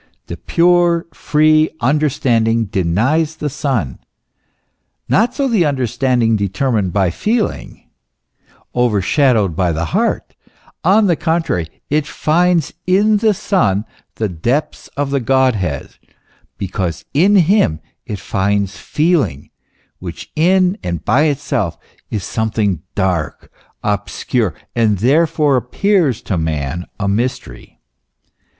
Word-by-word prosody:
The -, -, -6 dB
pure, 175 Hz, -1 st, +2 dB
free 155 Hz, +1 st, +3 dB
understanding 120 Hz, -5 st, +1 dB
denies 110 Hz, -, 0 dB
the 150 Hz, -2 st, -4 dB
Son, 125 Hz, -, -2 dB, 1.1 s
not 225 Hz, +4 st, +2 dB
so 280 Hz, -2 st, 0 dB
the 225 Hz, -8 st, +2 dB
understanding 125 Hz, -4 st, +1 dB
determined 100 Hz, 0 st, 0 dB
by 95 Hz, -3 st, +1 dB
feeling, 215 Hz, -, -2 dB, 0.9 s
overshadowed 115 Hz, -, +2 dB
by 90 Hz, -1 st, +1 dB
the 80 Hz, +1 st, -2 dB
heart; -, -, 0 dB, 0.5 s
on 205 Hz, +5 st, +4 dB
the 175 Hz, -4 st, +3 dB
contrary, 160 Hz, -, -2 dB
it 150 Hz, 0 st, +1 dB
finds 170 Hz, 0 st, +1 dB
in 205 Hz, +3 st, +3 dB
the 215 Hz, -1 st, +2 dB
Son 115 Hz, -, +1 dB, 0.3 s
the 110 Hz, -, -1 dB
depths 120 Hz, -, -2 dB
of 140 Hz, -1 st, -1 dB
the 140 Hz, -, +1 dB
Godhead, 120 Hz, -, 0 dB, 0.6 s
because 90 Hz, -4 st, -3 dB
in 185 Hz, +9 st, +4 dB
him 175 Hz, -, +3 dB, 0.2 s
it 105 Hz, -, -5 dB
finds 100 Hz, 0 st, -1 dB
feeling, 150 Hz, -, 0 dB, 0.5 s
which 85 Hz, -2 st, -8 dB
in 185 Hz, +4 st, +2 dB
and 85 Hz, -2 st, -4 dB
by 150 Hz, +4 st, +3 dB
itself 135 Hz, -, -1 dB, 0.3 s
is 105 Hz, -4 st, -3 dB
something 105 Hz, -6 st, -1 dB
dark, 90 Hz, -6 st, -2 dB, 0.3 s
obscure, 105 Hz, +2 st, -1 dB, 0.2 s
and 110 Hz, -3 st, +2 dB
therefore 145 Hz, -, +2 dB
appears 150 Hz, -, +1 dB
to 95 Hz, -5 st, -2 dB
man 80 Hz, +1 st, -3 dB
a 100 Hz, -, -1 dB
mystery. 115 Hz, +6 st, -3 dB
125 Hz, 110 wpm, -17 LUFS, 100-160 Hz, 1.1 s, on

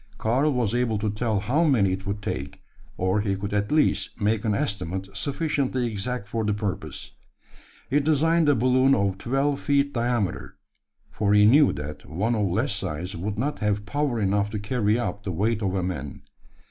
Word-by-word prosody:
Karl 130 Hz, +7 st, +1 dB
was 120 Hz, -5 st, 0 dB
able 120 Hz, -3 st, +1 dB
to 105 Hz, 0 st, -1 dB
tell 105 Hz, -1 st, -1 dB
how 135 Hz, +11 st, +1 dB
many 120 Hz, -, +3 dB
it 95 Hz, +1 st, -5 dB
would 100 Hz, +1 st, -3 dB
take; 70 Hz, -3 st, -5 dB, 0.3 s
or 95 Hz, +3 st, +1 dB
he 100 Hz, -2 st, 0 dB
could 100 Hz, +1 st, -5 dB
at 105 Hz, 0 st, 0 dB
least 155 Hz, 0 st, +1 dB
make 105 Hz, 0 st, +1 dB
an 105 Hz, -2 st, +1 dB
estimate 95 Hz, -2 st, -2 dB
sufficiently 135 Hz, -, -1 dB
exact 115 Hz, 0 st, -3 dB
for 110 Hz, +1 st, -2 dB
the 105 Hz, -1 st, 0 dB
purpose. 105 Hz, -3 st, -5 dB, 0.8 s
He 145 Hz, -, +2 dB
designed 160 Hz, +2 st, +3 dB
a 145 Hz, -, +5 dB
balloon 130 Hz, +3 st, +4 dB
of 100 Hz, -3 st, 0 dB
twelve 135 Hz, +3 st, 0 dB
feet 140 Hz, -1 st, +1 dB
diameter: 120 Hz, -5 st, -1 dB, 0.5 s
for 105 Hz, -1 st, +1 dB
he 105 Hz, 0 st, +6 dB
knew 140 Hz, +6 st, +6 dB
that 75 Hz, +1 st, -7 dB
one 100 Hz, +9 st, 0 dB
of 105 Hz, -3 st, +1 dB
less 90 Hz, -, 0 dB
size 90 Hz, +6 st, -4 dB
would 100 Hz, +4 st, -4 dB
not 145 Hz, +6 st, -2 dB
have 105 Hz, -1 st, 0 dB
power 140 Hz, 0 st, -1 dB
enough 100 Hz, 0 st, +1 dB
to 105 Hz, -, -4 dB
carry 105 Hz, 0 st, +1 dB
up 100 Hz, -4 st, -3 dB
the 95 Hz, -, -3 dB
weight 105 Hz, +6 st, 0 dB
of 95 Hz, -2 st, -1 dB
a 95 Hz, -, 0 dB
man. 75 Hz, -6 st, -5 dB
105 Hz, 185 wpm, -25 LUFS, 100-130 Hz, 0.8 s, he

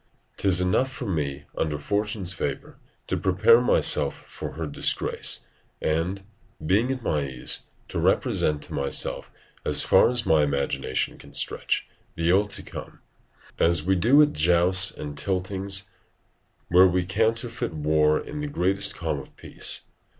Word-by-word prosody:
'Tis 95 Hz, -2 st, +4 dB
enough 90 Hz, +9 st, +1 dB
for 125 Hz, -, -7 dB
me, 70 Hz, -6 st, -3 dB
under 75 Hz, -2 st, -2 dB
fortune's 100 Hz, +3 st, -2 dB
favour, -, -, -5 dB, 0.3 s
to -, -, -2 dB
prepare 95 Hz, +6 st, +4 dB
myself 125 Hz, -, +2 dB
for -, -, -8 dB
her 80 Hz, +1 st, -5 dB
disgrace, 75 Hz, -, +1 dB, 0.4 s
and, 85 Hz, +5 st, -2 dB, 0.4 s
being 105 Hz, +9 st, +2 dB
at 130 Hz, -2 st, -5 dB
my 75 Hz, -7 st, 0 dB
ease, 65 Hz, -2 st, -1 dB, 0.2 s
to -, -, -4 dB
represent 75 Hz, -1 st, +1 dB
to -, -, -9 dB
myself, 70 Hz, -2 st, -1 dB, 0.3 s
as -, -, +3 dB
far -, -, +4 dB
as 120 Hz, -1 st, 0 dB
my 80 Hz, -1 st, +3 dB
imagination 70 Hz, -1 st, -2 dB
can -, -, -14 dB
stretch, -, -, -1 dB, 0.3 s
the 85 Hz, +1 st, +1 dB
ill 100 Hz, +3 st, +3 dB
to 100 Hz, -, -4 dB
come; -, -, -10 dB, 0.6 s
as 85 Hz, -2 st, +3 dB
we 95 Hz, +3 st, +1 dB
do 125 Hz, +12 st, +5 dB
at 150 Hz, -, 0 dB
jousts 90 Hz, +4 st, +4 dB
and 75 Hz, -1 st, -6 dB
tiltings, 95 Hz, +1 st, -1 dB, 0.8 s
where 90 Hz, +2 st, +6 dB
we 90 Hz, 0 st, 0 dB
counterfeit 115 Hz, +4 st, -1 dB
war 75 Hz, 0 st, +2 dB
in 150 Hz, -, -7 dB
the 150 Hz, -, -3 dB
greatest 95 Hz, -6 st, 0 dB
calm 80 Hz, -4 st, -3 dB
of -, -, -14 dB
peace. -, -, -2 dB
90 Hz, 150 wpm, -24 LUFS, 80-100 Hz, 0.8 s, where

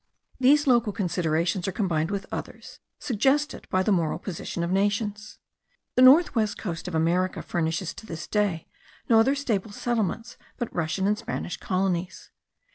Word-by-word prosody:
These 285 Hz, +4 st, +5 dB
local 240 Hz, -5 st, +3 dB
considerations 175 Hz, -2 st, 0 dB
are -, -, 0 dB
combined 170 Hz, -5 st, 0 dB
with 200 Hz, -1 st, -3 dB
others, -, -, -7 dB, 0.2 s
suggested 270 Hz, +5 st, 0 dB
by 185 Hz, 0 st, +2 dB
the 210 Hz, -, +1 dB
moral 170 Hz, -5 st, +1 dB
position 175 Hz, -2 st, -5 dB
of 170 Hz, -, -2 dB
nations. 205 Hz, +2 st, -1 dB, 0.6 s
The 255 Hz, -, +3 dB
north 275 Hz, +7 st, +7 dB
west 215 Hz, -4 st, 0 dB
coast 170 Hz, -5 st, -5 dB
of 180 Hz, -, -4 dB
America 175 Hz, +3 st, +1 dB
furnishes 165 Hz, +1 st, -2 dB
to 220 Hz, -, -12 dB
this 165 Hz, -3 st, -6 dB
day 205 Hz, -6 st, -1 dB, 0.4 s
no 225 Hz, -2 st, +6 dB
other 265 Hz, +5 st, +3 dB
stable 220 Hz, -7 st, -2 dB
settlements 230 Hz, +1 st, -2 dB, 0.2 s
but 240 Hz, -3 st, -4 dB
Russian 175 Hz, +3 st, -1 dB
and 210 Hz, +1 st, +1 dB
Spanish 230 Hz, -6 st, -4 dB
colonies. 185 Hz, -1 st, -2 dB
200 Hz, 155 wpm, -26 LUFS, 175-230 Hz, 0.6 s, north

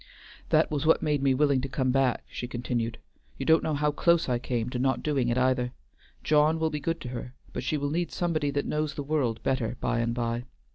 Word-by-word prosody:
"That -, -, +3 dB
was 150 Hz, -1 st, -1 dB
what 160 Hz, +1 st, +4 dB
made 150 Hz, -2 st, +1 dB
me 135 Hz, -1 st, +3 dB
willing 140 Hz, -1 st, +3 dB
to 135 Hz, -, -4 dB
come 130 Hz, -1 st, 0 dB
back," 135 Hz, -2 st, +2 dB
she 120 Hz, -, -5 dB
continued, 120 Hz, -2 st, -2 dB, 0.4 s
"you 135 Hz, -, -4 dB
don't 160 Hz, +2 st, +5 dB
know 155 Hz, -, -1 dB
how 150 Hz, +1 st, +1 dB
close 170 Hz, +3 st, +3 dB
I 125 Hz, -2 st, +1 dB
came 120 Hz, -2 st, -2 dB
to 125 Hz, -, -3 dB
not 130 Hz, -1 st, +1 dB
doing 140 Hz, -5 st, +1 dB
it 120 Hz, -, +1 dB
either. 125 Hz, -1 st, +1 dB, 0.5 s
John 155 Hz, +1 st, +4 dB
will 160 Hz, 0 st, +1 dB
be 150 Hz, -, -2 dB
good 165 Hz, +3 st, -2 dB
to 125 Hz, -, -5 dB
her, 125 Hz, +1 st, -6 dB, 0.2 s
but -, -, -3 dB
she 150 Hz, +4 st, 0 dB
will 145 Hz, 0 st, -2 dB
need 170 Hz, +2 st, -1 dB
somebody 160 Hz, -4 st, 0 dB
that 140 Hz, 0 st, -1 dB
knows 150 Hz, -1 st, -1 dB
the 145 Hz, -, -3 dB
world 140 Hz, -6 st, -1 dB
better 125 Hz, -3 st, -1 dB
by 120 Hz, -, 0 dB
and 115 Hz, 0 st, 0 dB
by. 120 Hz, 0 st, -2 dB
135 Hz, 235 wpm, -28 LUFS, 125-150 Hz, 0.5 s, don't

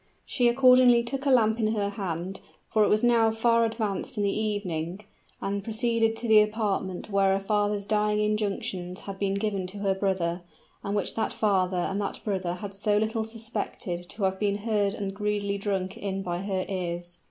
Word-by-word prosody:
She 245 Hz, -3 st, +2 dB
accordingly 250 Hz, -1 st, +6 dB
took 275 Hz, +4 st, -3 dB
a -, -, +4 dB
lamp 225 Hz, -3 st, +4 dB
in 220 Hz, 0 st, +1 dB
her 200 Hz, -1 st, 0 dB
hand, 190 Hz, -2 st, -4 dB, 0.3 s
for 215 Hz, -, +3 dB
it -, -, +4 dB
was 215 Hz, +2 st, +3 dB
now 235 Hz, -2 st, +4 dB
far 230 Hz, +1 st, +3 dB
advanced 220 Hz, -4 st, -2 dB
in 205 Hz, -, +1 dB
the 200 Hz, -, +1 dB
evening, 195 Hz, -4 st, -2 dB, 0.4 s
and 200 Hz, 0 st, -2 dB
proceeded 225 Hz, +1 st, +1 dB
to 235 Hz, -, -4 dB
the 215 Hz, -1 st, +7 dB
apartment 210 Hz, -3 st, -2 dB
where 195 Hz, -1 st, +3 dB
a -, -, 0 dB
father's 205 Hz, 0 st, 0 dB
dying 210 Hz, 0 st, +1 dB
injunctions 210 Hz, -3 st, -2 dB
had 195 Hz, -1 st, -7 dB
been 195 Hz, -1 st, 0 dB
given 200 Hz, -2 st, -1 dB
to 190 Hz, +3 st, -7 dB
her 200 Hz, -1 st, +1 dB
brother, 185 Hz, -3 st, -1 dB, 0.4 s
and 200 Hz, +1 st, -2 dB
which 205 Hz, -, 0 dB
that 225 Hz, -, -1 dB
father 190 Hz, -3 st, +1 dB
and 195 Hz, +3 st, -1 dB
that 200 Hz, -, -3 dB
brother 185 Hz, -4 st, -2 dB
had 200 Hz, +2 st, -7 dB
so 205 Hz, +1 st, +1 dB
little 220 Hz, +1 st, 0 dB
suspected 220 Hz, -6 st, -5 dB
to 210 Hz, -, -5 dB
have 190 Hz, 0 st, +1 dB
been 205 Hz, -1 st, +1 dB
heard 205 Hz, -2 st, +1 dB
and 200 Hz, -3 st, -4 dB
greedily 205 Hz, -1 st, -1 dB
drunk 195 Hz, -2 st, -2 dB
in 195 Hz, -1 st, -3 dB
by 175 Hz, -1 st, -2 dB
her 190 Hz, -2 st, -2 dB
ears. 175 Hz, -2 st, -4 dB
205 Hz, 190 wpm, -27 LUFS, 195-220 Hz, 0.4 s, the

